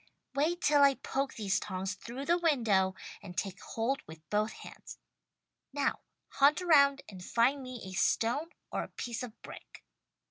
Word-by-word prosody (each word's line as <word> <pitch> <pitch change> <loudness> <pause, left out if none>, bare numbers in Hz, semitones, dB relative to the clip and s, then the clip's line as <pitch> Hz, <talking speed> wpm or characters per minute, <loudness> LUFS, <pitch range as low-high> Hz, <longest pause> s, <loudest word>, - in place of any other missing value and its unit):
"Wait 320 +5 +1
till 295 -1 +4
I 280 -1 +6
poke 270 +1 -3
these 205 -3 0
tongs 190 0 -3
through 235 +7 -7
the 345 +3 +3
window 220 - +2 0.3
and 180 -2 -10
take 195 -2 -3
hold 245 +5 -2
with 160 0 -13
both 210 +1 +1
hands. - - -11 0.8
Now! 285 -1 0 0.3
Hunt 285 +3 +4
around 280 -6 +5
and 185 -3 -10
find 250 +8 +2
me 255 -1 -7
a 190 - -7
stone 235 - +1 0.2
or - - -1
a - - -5
piece 235 -2 -5
of 240 -3 -8
brick." - - -11
245 Hz, 165 wpm, -31 LUFS, 200-280 Hz, 0.8 s, I